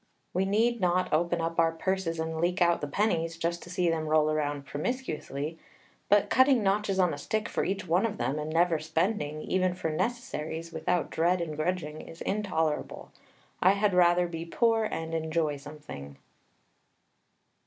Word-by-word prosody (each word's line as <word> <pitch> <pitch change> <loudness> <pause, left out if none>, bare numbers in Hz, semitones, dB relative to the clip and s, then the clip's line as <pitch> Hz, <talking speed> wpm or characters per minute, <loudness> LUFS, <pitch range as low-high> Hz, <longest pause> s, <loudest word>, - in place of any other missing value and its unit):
We 190 +1 +1
need 225 +3 +2
not 180 -1 +1
open 170 +2 +1
up 165 0 -2
our 165 -1 +4
purses 165 0 -2
and 160 0 -2
leak 180 +2 +1
out 170 -1 +3
the 145 - -2
pennies, 165 -1 0
just 170 +1 -2
to - - -11
see 180 -1 0
them 160 -1 0
roll 155 0 +3
around 145 -2 -1
promiscuously; 155 - -4 0.5
but 205 0 +5
cutting 260 -2 +5
notches 195 0 +1
on 180 -4 +3
a 145 - -6
stick 215 +7 -2
for - - -1
each 195 -1 -2
one 180 +7 +3
of 215 -1 -6
them, 145 +3 -1
and 150 +1 -4
never 165 0 +2
spending, 160 -1 -1
even 185 -1 +1
for 165 -3 -2
necessaries, 165 -6 -3
without 180 -1 -1
dread 175 +3 +2
and 160 -3 -3
grudging, 155 -1 -2
is 165 - -12
intolerable. 160 -7 -2 0.5
I 185 +2 +6
had 200 0 +1
rather 175 0 +4
be 165 -1 -5
poor 225 +5 +2
and 165 -5 -4
enjoy 160 -2 0
something. 140 - -10
170 Hz, 170 wpm, -29 LUFS, 155-190 Hz, 0.5 s, I